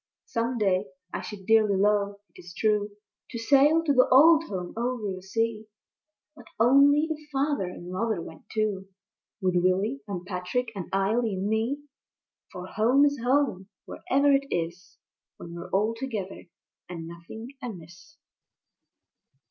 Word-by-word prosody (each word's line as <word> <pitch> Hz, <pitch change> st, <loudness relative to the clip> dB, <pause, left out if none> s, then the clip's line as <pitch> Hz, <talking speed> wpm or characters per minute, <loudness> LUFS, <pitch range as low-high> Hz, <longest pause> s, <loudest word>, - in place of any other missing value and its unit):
Some 235 Hz, +2 st, -2 dB
day 195 Hz, -2 st, +1 dB, 0.3 s
I -, -, -3 dB
should 200 Hz, -3 st, -9 dB
dearly 215 Hz, -2 st, +4 dB
love, 200 Hz, 0 st, +2 dB, 0.2 s
it -, -, -13 dB
is 175 Hz, -1 st, -12 dB
true, 210 Hz, -1 st, +1 dB, 0.4 s
To 240 Hz, -, -6 dB
sail 285 Hz, +7 st, +4 dB
to 295 Hz, -3 st, +2 dB
the 255 Hz, -1 st, +5 dB
old 315 Hz, +5 st, +7 dB
Home 180 Hz, -, -5 dB
over 235 Hz, -4 st, -2 dB
the 185 Hz, -, -8 dB
sea; 220 Hz, +2 st, -2 dB, 0.7 s
But 245 Hz, -6 st, -15 dB
only 280 Hz, +6 st, +5 dB
if 305 Hz, -1 st, -7 dB
Father 280 Hz, -5 st, 0 dB
and 180 Hz, 0 st, -8 dB
Mother 215 Hz, +1 st, -1 dB
went 160 Hz, -1 st, -11 dB
too, 210 Hz, -3 st, -1 dB, 0.5 s
With 185 Hz, -1 st, +1 dB
Willy 190 Hz, +9 st, +1 dB
and 180 Hz, -3 st, -5 dB
Patrick 190 Hz, +6 st, -3 dB
and 190 Hz, -3 st, -6 dB
Eily 210 Hz, +3 st, +1 dB
and 190 Hz, +2 st, -2 dB
me. 230 Hz, +7 st, -1 dB, 0.7 s
For 180 Hz, -, -7 dB
Home 240 Hz, +9 st, +3 dB
is 285 Hz, -1 st, 0 dB
Home 245 Hz, -7 st, +1 dB, 0.2 s
wherever 280 Hz, +2 st, +1 dB
it 275 Hz, 0 st, +2 dB
is, 170 Hz, 0 st, -4 dB, 0.4 s
When 170 Hz, -, -10 dB
we're 170 Hz, 0 st, -8 dB
all 210 Hz, +4 st, +1 dB
together 225 Hz, -6 st, -5 dB, 0.4 s
and 170 Hz, -2 st, -6 dB
nothing 170 Hz, +8 st, -10 dB
amiss. 190 Hz, -, -10 dB
215 Hz, 150 wpm, -27 LUFS, 185-255 Hz, 0.7 s, old